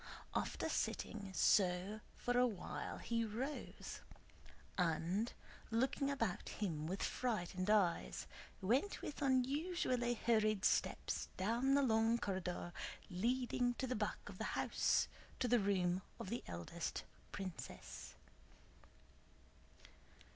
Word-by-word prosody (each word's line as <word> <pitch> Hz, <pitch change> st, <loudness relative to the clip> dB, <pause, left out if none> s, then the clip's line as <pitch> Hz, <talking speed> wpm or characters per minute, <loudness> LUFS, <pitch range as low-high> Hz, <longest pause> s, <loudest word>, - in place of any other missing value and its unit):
After -, -, 0 dB
sitting 205 Hz, -3 st, -1 dB
so 190 Hz, +2 st, +4 dB, 0.2 s
for 245 Hz, -, -1 dB
a 250 Hz, 0 st, +6 dB
while 205 Hz, -7 st, -4 dB
he 230 Hz, -1 st, 0 dB
rose, 245 Hz, +7 st, -4 dB, 0.8 s
and, 180 Hz, +5 st, +1 dB, 0.4 s
looking 265 Hz, +4 st, +2 dB
about 230 Hz, -10 st, -1 dB
him 160 Hz, -7 st, -2 dB
with 190 Hz, +3 st, -2 dB
frightened 185 Hz, -5 st, -1 dB
eyes, 200 Hz, -5 st, +3 dB, 0.4 s
went 260 Hz, -, +2 dB
with 295 Hz, -, -5 dB
unusually 260 Hz, -2 st, +2 dB
hurried 215 Hz, -3 st, +3 dB
steps -, -, +1 dB
down 235 Hz, +8 st, +3 dB
the 280 Hz, -, +5 dB
long 225 Hz, -1 st, +4 dB
corridor 185 Hz, -5 st, -2 dB, 0.4 s
leading 245 Hz, +5 st, +1 dB
to 265 Hz, -, -1 dB
the 255 Hz, -, -1 dB
back 210 Hz, 0 st, -2 dB
of -, -, -8 dB
the -, -, -1 dB
house, -, -, +3 dB, 0.3 s
to 250 Hz, -, +1 dB
the 245 Hz, 0 st, +5 dB
room 185 Hz, -3 st, +2 dB, 0.2 s
of 190 Hz, -, -5 dB
the 235 Hz, -, -2 dB
eldest 90 Hz, -, -3 dB, 0.3 s
princess. 190 Hz, -4 st, -6 dB
220 Hz, 110 wpm, -39 LUFS, 185-245 Hz, 0.8 s, a